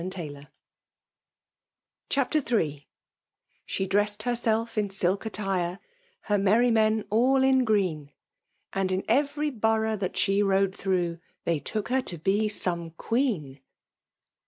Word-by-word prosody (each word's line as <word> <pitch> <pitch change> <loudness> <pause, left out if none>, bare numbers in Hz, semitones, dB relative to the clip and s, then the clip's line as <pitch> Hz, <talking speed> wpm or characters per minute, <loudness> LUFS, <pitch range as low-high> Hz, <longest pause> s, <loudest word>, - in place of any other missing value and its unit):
• - - -5
I - - -4
c3 150 -6 -7 1.6
CHAPTER 275 +2 +2
IlL 160 - -1 0.9
She 190 - -1
dressed 205 +2 0
henelf 230 -1 0
in 210 -2 0
silk 195 +1 0
sttirei 190 -5 -2 0.4
Her 205 -2 0
merry 220 +5 +4
men 220 -1 +2
all 260 +5 +4
in 265 -1 +4
gteen; 185 -10 0 0.6
And 195 -1 0
in 185 +1 0
every 295 +1 +1
borough 220 -2 +1
that 190 -2 -3
she 195 0 +2
rode 195 -1 +2
through, 175 -3 -1 0.3
They 165 -2 +1
took 215 +8 -4
her 260 +1 +2
to 180 -9 -6
be 200 +6 +1
some 170 -5 0
queen. 205 - -1
205 Hz, 135 wpm, -27 LUFS, 185-230 Hz, 1.6 s, merry